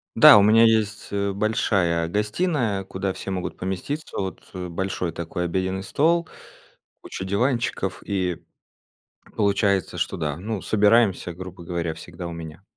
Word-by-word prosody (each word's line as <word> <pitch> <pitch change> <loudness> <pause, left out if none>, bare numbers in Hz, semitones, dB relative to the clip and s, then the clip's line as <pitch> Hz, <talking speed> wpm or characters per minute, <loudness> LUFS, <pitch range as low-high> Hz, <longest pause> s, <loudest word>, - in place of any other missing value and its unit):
Да, 155 -7 +10
у - - +7
меня 110 +3 +6
есть, 110 -2 +2
э, 100 0 0
большая 95 -5 +1
гостиная 105 - 0
куда 95 0 -3
все - - -7
могут 95 -1 -4
поместиться, 95 - -4
вот, 95 -1 -4
э, 90 -1 -5
большой 90 -1 -3
такой 85 +1 -4
обеденный 95 +2 -2
стол, 165 - +2 0.7
куча 95 - -6
диванчиков 115 -2 -1
и 95 -4 -2 0.9
получается 100 -3 +1
что - - -2
да, 75 -2 -2
ну 105 +2 -4
собираемся 105 -4 +3
грубо 90 0 -9
говоря 85 -2 -3
всегда 85 - -8
у - - -6
меня. 80 +3 -9
95 Hz, 140 wpm, -24 LUFS, 90-110 Hz, 0.9 s, Да